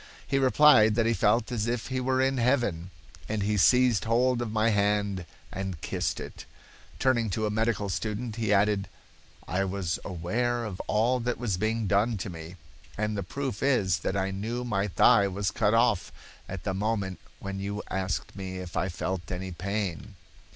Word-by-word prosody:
He 135 - +1
replied 130 -5 +6
that 115 0 +2
he 115 - +3
felt 115 +2 +2
as 115 -2 -1
if 120 0 -2
he 130 -1 -1
were 130 +1 +1
in 135 0 +2
heaven, 115 -9 +1 0.4
and 105 -2 -1
he 105 +1 +1
seized 125 +2 +4
hold 120 +2 +2
of 115 -3 -3
my 110 +1 +2
hand 100 -3 0 0.2
and 95 -3 -4
kissed - - -2
it. - - -8 0.5
Turning 120 -4 +2
to 110 +2 -1
a 105 - -1
medical 110 -1 0
student, 110 +4 -3
he 110 -3 0
added: 100 0 +2 0.6
'I 95 +3 0
was 95 -2 -2
aware 115 +7 -1
of 95 -4 -6
all 115 +4 +2
that 120 0 -2
was 115 -5 -1
being 110 +2 0
done 105 +3 +2
to 95 0 -5
me, 80 +1 -9 0.4
and 105 0 -1
the 100 - -2
proof 130 +3 -4
is 105 -11 +2
that 95 - -2
I 95 0 0
knew 115 +5 -3
my 105 -4 0
thigh 100 +1 +5
was 100 +1 -2
cut 110 -1 +2
off 115 -6 +2 0.4
at 95 -2 -6
the 95 - -1
moment 100 -2 -2 0.2
when 100 0 -5
you 100 +1 -4
asked 95 0 -2
me 95 -1 -5
if 90 -1 -7
I 95 - 0
felt 95 +1 -4
any 95 +1 -4
pain. 100 +1 -4
105 Hz, 185 wpm, -28 LUFS, 95-120 Hz, 0.6 s, replied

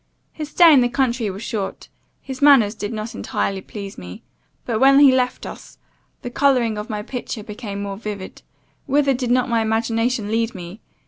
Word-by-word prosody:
His 305 -2 -6
stay 335 0 +6
in 270 - +6
the 245 - +2
country 240 -4 0
was 195 +3 -7
short; 210 -5 -4 0.4
his 265 -1 -7
manners 270 -8 +6
did 210 -2 -5
not 220 0 -5
entirely 195 -1 -3
please 200 0 -8
me; 90 0 -10 0.4
but, 225 -3 -1
when 275 +2 +6
he 285 -2 +8
left 250 -1 0
us, - - -10 0.5
the 245 - -5
colouring 250 -5 +2
of 210 +2 -6
my 210 -1 -4
picture 245 -2 -6
became 205 -1 -6
more 200 -1 -5
vivid 205 -3 -7 0.5
Whither 280 0 +2
did 250 -1 -3
not 250 0 +2
my 230 -1 +1
imagination 225 0 -1
lead 225 0 0
me? 180 +4 -9
230 Hz, 185 wpm, -21 LUFS, 210-255 Hz, 0.5 s, he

